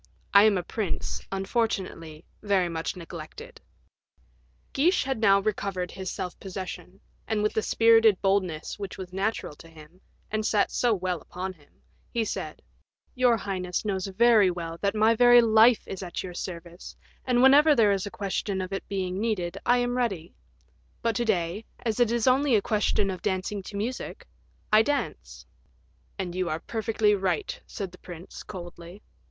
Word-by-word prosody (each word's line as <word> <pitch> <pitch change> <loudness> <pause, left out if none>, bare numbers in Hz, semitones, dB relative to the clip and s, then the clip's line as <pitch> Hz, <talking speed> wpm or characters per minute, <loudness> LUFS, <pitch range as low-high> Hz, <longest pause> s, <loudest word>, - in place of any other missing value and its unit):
I 200 +1 +8
am 210 -3 +4
a 180 - -2
prince, 200 0 -3
unfortunately, 190 -6 -2 0.2
very 195 -4 +1
much 165 +2 -3
neglected." 180 - -10 1.1
Guiche 335 +7 +3
had 265 -3 -2
now 195 -3 +5
recovered 195 -3 -2
his 190 -1 -5
self 180 -1 -5
possession, 190 0 -7 0.3
and 215 -2 0
with 210 - +1
the 220 - +1
spirited 225 -3 +4
boldness 190 -4 -1
which 200 -2 -6
was 185 -1 -8
natural 195 -5 -2
to 165 - -14
him, 160 +3 -16 0.3
and 215 0 -1
sat 210 -1 +1
so 245 - +1
well 180 -5 -1
upon 185 +1 -6
him, 150 -5 -27 0.3
he 230 -1 -1
said, - - -5 0.5
"Your 250 -2 +3
highness 185 -2 -3
knows 195 -2 -1
very 215 0 +5
well 170 -2 -5
that 200 +1 0
my 220 +1 +4
very 245 +1 +7
life 225 0 +5
is 195 - -6
at 175 -2 -5
your 180 -1 -7
service, 175 0 -8 0.3
and 250 -1 +2
whenever 290 +3 +7
there 215 -4 +4
is 195 0 -1
a - - -4
question 195 0 -3
of 185 +1 -4
its 195 - -4
being 190 -1 -3
needed, 200 -6 -1
I 245 - +5
am 245 0 0
ready; 195 -10 -2 0.7
but 230 -1 +1
to 240 - 0
day, 185 -1 -1 0.2
as 225 0 -1
it 240 -2 +3
is 235 -2 +1
only 265 0 +4
a 210 - +3
question 205 -2 +1
of 185 - -6
dancing 190 +2 -2
to 200 +2 -8
music, 235 +5 -4 0.5
I 215 - +8
dance." 285 +5 -3 0.7
"And 185 -3 -4
you 185 -1 -1
are 155 0 -2
perfectly 220 +1 0
right," 385 - -1
said 195 -5 -6
the 180 - -15
prince, 175 0 -10
coldly. 175 0 -10
200 Hz, 170 wpm, -27 LUFS, 180-225 Hz, 1.1 s, I